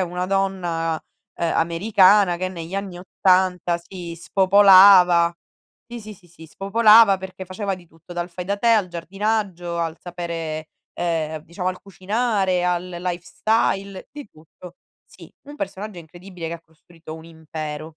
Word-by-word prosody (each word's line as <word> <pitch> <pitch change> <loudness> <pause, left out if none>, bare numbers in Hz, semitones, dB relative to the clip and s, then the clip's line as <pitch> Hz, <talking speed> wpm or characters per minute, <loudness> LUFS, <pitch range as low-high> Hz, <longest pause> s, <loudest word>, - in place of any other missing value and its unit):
una 180 +1 -3
donna, 175 -4 -1 0.3
ehm, 170 -1 -2
americana, 185 +2 +3
che 185 +1 -3
negli 170 0 -8
anni 195 -3 -5
'80 180 -2 +1
si 170 -1 -9
spopolava. 185 -2 +6 0.5
Sì, 240 0 -8
sì, 215 0 -10
sì, 175 -2 -22
sì, 165 -1 -15
spopolava, 210 +3 +5
perché 190 0 -9
faceva 195 +1 -4
di 180 -1 -16
tutto, 165 +2 -15
dal 175 0 -4
fai 180 +1 -7
da 200 +2 -2
te, 235 - 0
al 215 -5 +3
giardinaggio, 180 0 -3
al 165 -1 -2
sapere 165 -3 -6 0.3
ehm, 160 -2 -2
diciamo 180 +2 -4
al 185 0 -5
cucinare, 195 -1 -1
al 180 0 -1
lifestyle, 185 +3 -2
di 290 -5 -10
tutto. 165 +3 -15 0.3
Sì, - - -16 0.2
un 295 - -10
personaggio 210 - -6
incredibile 175 +1 -10
che 170 - -5
ha 170 - -10
costruito 160 0 -14
un 160 0 -12
impero. 155 -1 -8
180 Hz, 145 wpm, -22 LUFS, 170-195 Hz, 0.5 s, spopolava